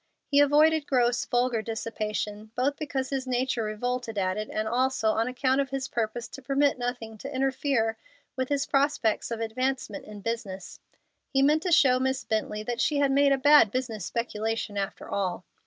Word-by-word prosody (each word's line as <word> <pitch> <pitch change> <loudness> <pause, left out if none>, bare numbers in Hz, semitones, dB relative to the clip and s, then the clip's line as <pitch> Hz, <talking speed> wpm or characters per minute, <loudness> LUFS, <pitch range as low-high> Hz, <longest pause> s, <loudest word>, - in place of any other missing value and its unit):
He 285 - +3
avoided 300 +1 +4
gross, 245 -2 +2
vulgar 245 -2 +1
dissipation, 215 -1 -4
both 270 +3 +1
because 280 -4 -3
his 265 -1 -2
nature 250 -1 0
revolted 225 +1 -3
at 185 -1 0
it, 215 0 -4
and 215 0 -2
also 245 -1 +1
on 225 +2 0
account 260 +2 +1
of 275 - -3
his 270 0 -3
purpose 230 +1 -3
to 270 - -10
permit 275 0 +1
nothing 240 -3 -4
to 275 - -7
interfere 265 -4 0 0.4
with 260 -1 -2
his 285 -1 +1
prospects 275 -6 +1
of 230 -1 -3
advancement 260 +4 -2
in 210 -1 -10
business. 200 -4 -5 0.5
He 270 -1 +2
meant 300 +3 +4
to 360 - -2
show 260 -6 +5
Miss 265 0 0
Bently 215 -1 -2
that 240 +1 -2
she 295 - +1
had 280 -1 +3
made 280 +1 +4
a 275 - +4
bad 290 -4 +6
business 230 -3 -3
speculation 225 -1 -3
after 200 -1 -4
all. 185 -2 -2
250 Hz, 180 wpm, -27 LUFS, 220-270 Hz, 0.5 s, bad